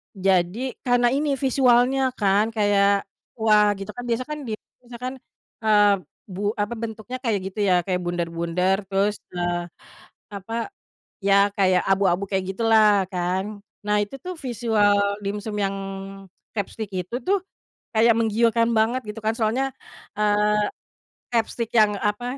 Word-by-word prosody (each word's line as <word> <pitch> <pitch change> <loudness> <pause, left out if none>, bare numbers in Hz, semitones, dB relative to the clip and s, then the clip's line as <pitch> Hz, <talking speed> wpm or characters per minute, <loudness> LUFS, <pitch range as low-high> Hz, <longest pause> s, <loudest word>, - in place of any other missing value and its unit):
Jadi 190 +6 +1
karena 245 -1 +3
ini 285 +1 +1
visualnya 260 0 +3
kan 205 +1 +2
kayak, 200 -1 +3 0.3
wah 215 -2 +4
gitu 195 +2 -7
kan 245 - -8
biasa 235 +1 0
kan 300 0 -4
di 220 - -3 0.3
misalkan, 250 +1 -6 0.5
ah, 205 -2 +4 0.3
bu 205 +1 -2
apa 205 +3 -1
bentuknya 225 +2 -5
kayak 225 -5 +1
gitu 210 - -8
ya 185 - +4
kayak 185 -2 0
bundar-bundar 175 +2 0
terus, 200 +2 0 0.2
eee, 175 0 -1 0.7
apa, 225 - -4 0.5
iya 200 0 +4
kayak 185 -2 +3
abu-abu 195 -1 +2
kayak 190 -1 0
gitulah 215 -3 +4
kan 190 +3 -2 0.3
nah 210 0 +2
itu 205 +6 -6
tuh 365 0 -4
visual 225 -7 +1 0.3
dimsum 210 +1 -4
yang 195 -1 0 0.8
crabstick 210 0 -4
itu 185 +5 -3
tuh, 400 +1 +3 0.6
kayak 225 +1 +5
menggiurkan 230 +1 +2
banget 230 +4 +2
gitu 210 +1 -6
kan 220 - +2
soalnya, 245 +5 +1 0.5
eee, 210 0 +2 0.6
crabstick 230 0 -1
yang 215 -2 +5
apa 245 +5 -2
210 Hz, 135 wpm, -23 LUFS, 195-235 Hz, 0.8 s, kayak